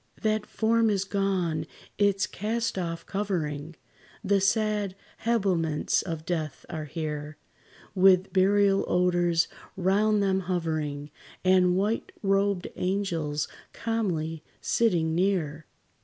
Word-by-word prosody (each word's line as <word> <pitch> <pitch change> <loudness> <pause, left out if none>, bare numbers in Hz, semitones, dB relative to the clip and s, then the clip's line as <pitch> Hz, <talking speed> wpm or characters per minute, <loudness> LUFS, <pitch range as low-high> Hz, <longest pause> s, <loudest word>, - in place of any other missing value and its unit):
That 215 -1 +1
form 225 0 +2
is 195 -2 +1
gone; 185 -5 -1 0.3
its 200 -1 +3
cast 225 +5 -2
off 165 -2 -4
covering, 165 -6 -3 0.5
The 200 -1 +2
sad 210 -1 +1 0.3
habiliments 185 -9 +1
of 165 -3 -5
death, 155 -5 -3
are 155 -3 -4
here, 150 0 -5 0.6
With 190 -1 +4
burial 195 +1 +4
odors 175 -2 +2 0.3
round 205 +3 +2
them 190 -1 +2
hovering, 155 -5 -2 0.3
And 185 -1 +4
white 210 +4 -1
robed 195 -1 +1
angels 170 -6 -1 0.3
calmly 170 -9 -2 0.2
sitting 170 -9 +1
near. 165 -4 0
185 Hz, 105 wpm, -27 LUFS, 160-200 Hz, 0.6 s, With